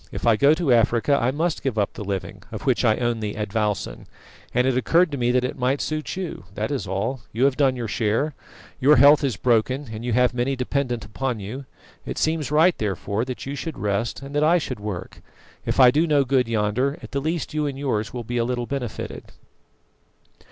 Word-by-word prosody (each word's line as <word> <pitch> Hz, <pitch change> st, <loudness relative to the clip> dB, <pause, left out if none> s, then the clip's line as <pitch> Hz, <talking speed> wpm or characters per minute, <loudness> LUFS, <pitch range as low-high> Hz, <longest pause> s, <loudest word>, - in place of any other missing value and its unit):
If -, -, -5 dB
I 115 Hz, -2 st, +5 dB
go 140 Hz, +7 st, +5 dB
to 160 Hz, -6 st, +2 dB
Africa 120 Hz, +4 st, +3 dB
I 120 Hz, -, +2 dB
must 160 Hz, +5 st, -1 dB
give 130 Hz, -5 st, -2 dB
up 100 Hz, -2 st, 0 dB
the -, -, -6 dB
living, 100 Hz, -2 st, -4 dB
of -, -, -6 dB
which -, -, +1 dB
I 110 Hz, -, +3 dB
own 120 Hz, -2 st, 0 dB
the 105 Hz, -1 st, -4 dB
advowson, 105 Hz, -1 st, -2 dB, 0.4 s
and 125 Hz, +1 st, +2 dB
it 130 Hz, -1 st, +2 dB
occurred 165 Hz, +6 st, +3 dB
to 140 Hz, -, -3 dB
me 120 Hz, 0 st, +1 dB
that 125 Hz, 0 st, +2 dB
it 125 Hz, -, -3 dB
might 130 Hz, +3 st, +1 dB
suit 155 Hz, 0 st, -3 dB
you 180 Hz, -, -5 dB
that 110 Hz, +6 st, -2 dB
is 135 Hz, -8 st, -2 dB
all. 110 Hz, +8 st, -2 dB
You 125 Hz, +4 st, +1 dB
have 140 Hz, -2 st, +3 dB
done 135 Hz, -2 st, +2 dB
your 120 Hz, -2 st, -4 dB
share; 115 Hz, +8 st, 0 dB, 0.5 s
your 145 Hz, +3 st, +6 dB
health 145 Hz, +3 st, +7 dB
is 135 Hz, -6 st, 0 dB
broken, 125 Hz, +4 st, +1 dB
and 110 Hz, +1 st, -6 dB
you 120 Hz, -1 st, -1 dB
have 125 Hz, +1 st, +3 dB
many 125 Hz, +3 st, 0 dB
dependent 125 Hz, -2 st, -2 dB
upon 120 Hz, +3 st, -3 dB
you. 120 Hz, +8 st, -7 dB, 0.4 s
It -, -, -6 dB
seems 155 Hz, -3 st, 0 dB
right, 160 Hz, +4 st, +4 dB
therefore, 105 Hz, +2 st, -2 dB
that 130 Hz, -1 st, -6 dB
you 135 Hz, -, -4 dB
should 160 Hz, +2 st, -5 dB
rest, 105 Hz, +6 st, -2 dB
and 140 Hz, +1 st, -8 dB
that 145 Hz, +1 st, +2 dB
I 165 Hz, +3 st, +5 dB
should 130 Hz, -8 st, -4 dB
work. 100 Hz, -3 st, -6 dB, 0.5 s
If -, -, 0 dB
I 125 Hz, -2 st, +8 dB
do 155 Hz, +5 st, +2 dB
no 145 Hz, -3 st, +3 dB
good 130 Hz, -2 st, +2 dB
yonder, 115 Hz, +6 st, 0 dB
at -, -, -9 dB
the 140 Hz, -, -1 dB
least 160 Hz, +1 st, -2 dB
you 150 Hz, -1 st, 0 dB
and 135 Hz, -2 st, -4 dB
yours 110 Hz, -6 st, -1 dB
will 120 Hz, -1 st, -5 dB
be 120 Hz, +2 st, -3 dB
a 115 Hz, -, +2 dB
little 120 Hz, 0 st, -2 dB
benefited." 125 Hz, -4 st, -5 dB
125 Hz, 220 wpm, -23 LUFS, 110-140 Hz, 0.5 s, I